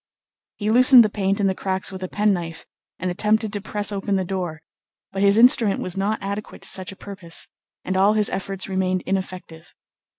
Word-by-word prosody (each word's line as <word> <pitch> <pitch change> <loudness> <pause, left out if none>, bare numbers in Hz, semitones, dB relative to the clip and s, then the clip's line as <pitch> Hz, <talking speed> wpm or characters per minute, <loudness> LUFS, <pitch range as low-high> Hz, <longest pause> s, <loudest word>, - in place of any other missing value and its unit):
He 210 0 -2
loosened 250 +1 +8
the 210 - -2
paint 195 -1 -1
in 200 - +1
the 190 - +2
cracks 190 0 -1
with 190 -1 -8
a 185 - -3
penknife, 180 -5 -1 0.3
and 185 0 -3
attempted 215 +3 0
to 205 - -3
press 210 0 -2
open 200 0 -2
the 190 -1 -1
door; 175 -4 -4 0.5
but 195 - -3
his 200 +1 +4
instrument 230 -3 +5
was 180 - -4
not 200 +3 -1
adequate 200 +2 -6
to - - -7
such 185 0 -3
a - - -11
purpose, 190 -4 -8 0.4
and 185 - -2
all 195 +3 +4
his 215 -1 +1
efforts 195 0 -3
remained 185 -1 -1
ineffective. 185 -4 -5
195 Hz, 195 wpm, -22 LUFS, 185-210 Hz, 0.5 s, loosened